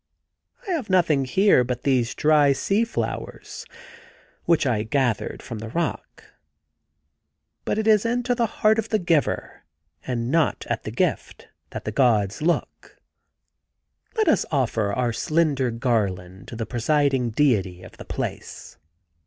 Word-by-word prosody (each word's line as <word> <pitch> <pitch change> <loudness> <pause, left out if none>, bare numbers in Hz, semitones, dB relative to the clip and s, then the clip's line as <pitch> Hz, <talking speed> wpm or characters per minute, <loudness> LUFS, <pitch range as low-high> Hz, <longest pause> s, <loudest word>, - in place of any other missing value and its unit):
I - - -2
have 300 - -2
nothing 165 -7 +2
here 190 0 +4
but 125 0 -4
these 125 -4 +1
dry 150 -2 +4
sea 200 +10 +1
flowers 230 - -5 0.8
which 170 -3 +2
I 115 -5 +1
gathered 120 0 -1
from 115 - -7
the 110 +1 -7
rock, 165 +5 -4 1.4
but - - -1
it 220 - -1
is 215 -2 +4
into 245 +1 0
the 235 -1 0
heart 215 +1 +2
of 225 - -3
the 215 - +2
giver, 170 -6 -1 0.4
and 120 -1 -3
not 165 -2 +1
at - - -3
the - - -4
gift, - - -2 0.2
that - - -7
the 105 - -2
gods 110 -4 +2
look.... 170 +2 -2 1.2
Let 435 - +2
us 315 - +3
offer 115 -7 0
our 120 +2 -1
slender 150 -3 +1
garland 100 -6 -2
to - - -8
the 115 0 -3
presiding 130 +2 +1
deity 105 -8 +1
of 90 - -14
the - - -10
place.' - - -6
135 Hz, 145 wpm, -23 LUFS, 115-175 Hz, 1.4 s, here